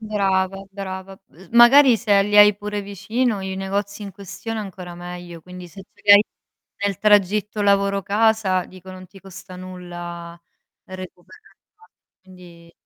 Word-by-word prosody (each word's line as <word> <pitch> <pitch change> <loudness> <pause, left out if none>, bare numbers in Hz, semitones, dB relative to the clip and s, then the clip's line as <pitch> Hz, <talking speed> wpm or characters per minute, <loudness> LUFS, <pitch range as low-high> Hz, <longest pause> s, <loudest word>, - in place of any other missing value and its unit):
Brava, 195 -3 -1
brava. 195 -1 -8
Ehm, 180 +3 -18
magari, 240 +1 +7
se 205 -3 +3
li 205 +1 +1
hai 210 0 +7
pure 205 0 -5
vicino 205 +3 -2
i 190 0 -5
negozi 200 +2 -4
in 200 - -8
questione 205 +4 -7
ancora 185 -4 -8
meglio, 175 -1 -9
quindi 180 +1 -11
se 195 +3 -12
ce - - -26
l'hai 205 0 +8 0.6
nel 200 -2 -2
tragitto 210 0 +2
lavoro 200 -1 +2
casa, 210 -3 +1
dico, 185 0 -13
non 185 0 -12
ti 195 +1 -16
costa 190 -1 -12
nulla 175 -2 -9 0.4
recuperarla. 185 - -14 0.3
Quindi 175 -3 -16
195 Hz, 140 wpm, -21 LUFS, 185-210 Hz, 0.6 s, l'hai